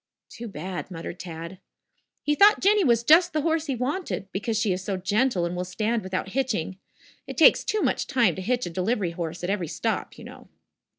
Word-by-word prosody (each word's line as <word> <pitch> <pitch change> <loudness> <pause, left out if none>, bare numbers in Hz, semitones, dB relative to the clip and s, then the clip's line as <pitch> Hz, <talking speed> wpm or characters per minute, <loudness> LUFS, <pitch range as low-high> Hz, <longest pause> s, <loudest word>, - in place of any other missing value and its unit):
"Too 235 +1 -8
bad," 185 -1 -6
muttered 170 0 -7
Tad. 170 +1 -8 0.6
"He 295 - +1
thought 405 +7 +6
Jinny 410 +1 +4
was 235 -5 +3
just 340 +7 +5
the 305 -2 0
horse 325 -1 0
he 270 - -1
wanted, 260 - -3
because 210 +3 -2
she 215 -3 +1
is 180 +1 -5
so 195 -1 -2
gentle 205 0 +1
and 170 +1 -3
will 180 - -2
stand 215 +5 -1
without 190 0 -4
hitching. 210 -7 -2 0.5
It - - -7
takes - - +6
too 430 - -1
much - - 0
time 235 -9 +2
to 190 - -6
hitch 245 +5 -1
a 175 - -5
delivery 185 +1 -1
horse 170 0 -5
at 180 - -1
every 190 -5 -2
stop, - - -3
you - - -11
know!" - - -12
205 Hz, 210 wpm, -25 LUFS, 180-260 Hz, 0.6 s, thought